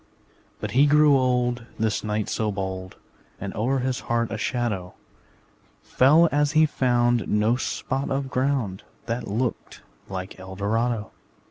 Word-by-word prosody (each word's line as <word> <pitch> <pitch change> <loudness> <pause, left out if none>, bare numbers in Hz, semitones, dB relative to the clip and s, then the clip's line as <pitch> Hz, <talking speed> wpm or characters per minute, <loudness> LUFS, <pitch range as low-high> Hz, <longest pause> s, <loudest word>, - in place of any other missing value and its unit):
But - - -4
he 140 +4 +5
grew 150 0 +5
old, 125 -2 +1
This 110 -1 0
knight 105 -1 -1
so 110 -1 -1
bold, 95 -1 -5 0.4
And 100 0 -5
o'er 125 +5 0
his 130 0 -1
heart 115 -1 -1
a 110 - -3
shadow 105 -9 -2 0.9
Fell 155 +6 +5
as 145 +1 +1
he 155 0 +6
found 120 -4 +1
No 105 +3 +2
spot 130 +1 -3
of 135 -1 -2
ground 130 -8 0 0.2
That 115 +1 -3
looked 115 +4 -3 0.3
like 95 0 -6
Eldorado. 105 +4 -2
120 Hz, 135 wpm, -24 LUFS, 105-130 Hz, 0.9 s, he